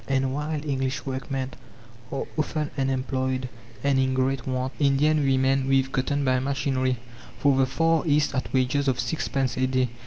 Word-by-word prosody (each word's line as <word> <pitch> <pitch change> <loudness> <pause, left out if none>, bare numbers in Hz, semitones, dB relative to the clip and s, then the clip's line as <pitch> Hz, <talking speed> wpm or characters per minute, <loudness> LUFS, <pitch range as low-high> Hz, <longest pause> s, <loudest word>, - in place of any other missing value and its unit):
And 135 -1 +1
while 150 +1 -3
English 135 -2 -1
workmen 135 0 -3 0.6
are 135 - -2
often 155 -1 -1
unemployed 130 -1 -1 0.4
and 140 -1 +3
in 130 0 +1
great 130 0 0
want, 130 0 -1
Indian 145 +2 +3
women 135 0 +2
weave 135 0 +2
cotton 140 +2 0
by 130 -1 +3
machinery, 130 -1 0 0.4
for 140 -2 +3
the 130 0 +3
Far 165 +4 +2
East 150 -1 +3
at 130 - -2
wages 130 +2 +1
of 130 -2 +1
six 160 - -1
pence 130 -2 -1
a 130 0 +2
day. 130 -1 +1
135 Hz, 165 wpm, -25 LUFS, 130-140 Hz, 0.6 s, and